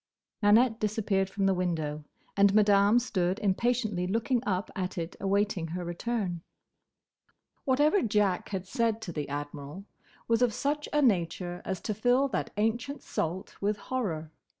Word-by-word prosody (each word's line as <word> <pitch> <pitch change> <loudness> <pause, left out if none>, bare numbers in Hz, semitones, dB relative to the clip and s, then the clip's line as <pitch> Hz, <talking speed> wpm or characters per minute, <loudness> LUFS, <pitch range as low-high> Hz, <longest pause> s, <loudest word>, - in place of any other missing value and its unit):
Nanette 225 +2 +4
disappeared 205 -2 0
from 195 0 -1
the 195 - +4
window, 160 -5 -2 0.3
and 200 0 +4
Madame 205 +1 +5
stood 190 -6 0
impatiently 210 -2 0
looking 230 +5 +1
up 190 0 -1
at 185 -1 -3
it 170 0 -4
awaiting 200 -3 0
her 175 +2 -4
return. 180 -1 -2 1.2
Whatever 295 +8 +3
Jack 205 -4 +1
had 190 -2 -3
said 230 +1 0
to 175 - -5
the 150 -3 -4
Admiral 145 +5 -6 0.4
was 230 0 +2
of 240 -4 +2
such 295 +1 -1
a 295 0 +2
nature 175 -5 0
as 190 -2 -2
to 215 - -2
fill 245 +6 +3
that 190 - -2
ancient 235 +6 -1
salt 175 +4 -3
with 205 +1 0
horror. 180 -11 -3
200 Hz, 150 wpm, -29 LUFS, 180-230 Hz, 1.2 s, Madame